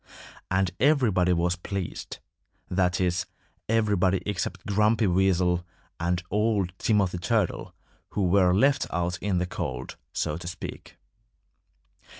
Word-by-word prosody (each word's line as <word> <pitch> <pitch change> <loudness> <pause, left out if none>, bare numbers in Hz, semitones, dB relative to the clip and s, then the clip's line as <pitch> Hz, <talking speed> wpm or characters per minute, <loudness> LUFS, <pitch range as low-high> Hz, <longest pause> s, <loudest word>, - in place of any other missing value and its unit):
And 95 -1 +1
everybody 115 -10 +3
was 85 +1 +1
pleased 95 0 -5 0.5
that 90 -1 +1
is, 90 -1 0 0.4
everybody 100 -4 +2
except 100 -4 -3
Grumpy 105 +2 +2
Weasel 90 -1 +2 0.4
and 85 +1 0
old 105 -3 +1
Timothy 100 -5 +1
Turtle, 105 +1 -1 0.3
who 100 - -1
were 90 0 +4
left 135 +9 +3
out 90 +1 -1
in 95 -2 0
the 90 - +1
cold, 65 -7 -5
so 75 - -2
to 85 0 -8
speak. 90 -1 -8
90 Hz, 120 wpm, -26 LUFS, 90-105 Hz, 0.5 s, were